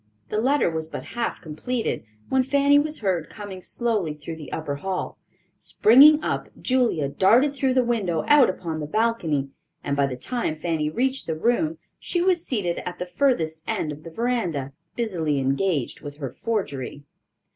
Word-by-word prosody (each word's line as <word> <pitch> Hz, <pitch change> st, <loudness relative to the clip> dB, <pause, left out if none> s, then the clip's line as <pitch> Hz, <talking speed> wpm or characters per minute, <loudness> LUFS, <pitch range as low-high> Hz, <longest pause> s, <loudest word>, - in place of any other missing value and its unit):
The 215 Hz, -, 0 dB
letter 275 Hz, +4 st, +3 dB
was 160 Hz, -1 st, -2 dB
but -, -, -6 dB
half 235 Hz, 0 st, -2 dB
completed, 225 Hz, +10 st, -3 dB, 0.3 s
when 265 Hz, -, +3 dB
Fanny 280 Hz, +2 st, +4 dB
was 305 Hz, -1 st, -1 dB
heard 180 Hz, -6 st, 0 dB
coming 205 Hz, -3 st, -8 dB
slowly 210 Hz, -9 st, -1 dB
through 155 Hz, +2 st, -7 dB
the 150 Hz, -4 st, -9 dB
upper 145 Hz, -3 st, -3 dB
hall. 185 Hz, +4 st, -4 dB, 0.4 s
Springing 295 Hz, +7 st, +6 dB
up, -, -, -2 dB
Julia 245 Hz, -, +1 dB
darted 235 Hz, -, +4 dB
through 265 Hz, -2 st, 0 dB
the 255 Hz, -, +4 dB
window 205 Hz, -9 st, 0 dB
out 295 Hz, -3 st, +6 dB
upon 165 Hz, -4 st, -4 dB
the 150 Hz, -, -4 dB
balcony, 165 Hz, -9 st, 0 dB, 0.3 s
and 140 Hz, -, -1 dB
by 140 Hz, -1 st, +2 dB
the 130 Hz, -2 st, -5 dB
time 235 Hz, -, -2 dB
Fanny 155 Hz, -1 st, -1 dB
reached 260 Hz, -, -1 dB
the 160 Hz, -, -1 dB
room 305 Hz, -, +1 dB, 0.2 s
she 350 Hz, -, -1 dB
was 350 Hz, -1 st, +2 dB
seated 195 Hz, -, -1 dB
at 180 Hz, -, -5 dB
the 180 Hz, -, -4 dB
furthest 175 Hz, -, 0 dB
end 150 Hz, -, -1 dB
of 150 Hz, +1 st, -8 dB
the 165 Hz, -, -9 dB
veranda, 175 Hz, -, -2 dB, 0.2 s
busily 170 Hz, -11 st, -1 dB
engaged 135 Hz, +1 st, 0 dB
with 145 Hz, -1 st, -8 dB
her 135 Hz, -5 st, -5 dB
forgery. 145 Hz, -, -3 dB
190 Hz, 170 wpm, -24 LUFS, 155-250 Hz, 0.4 s, Springing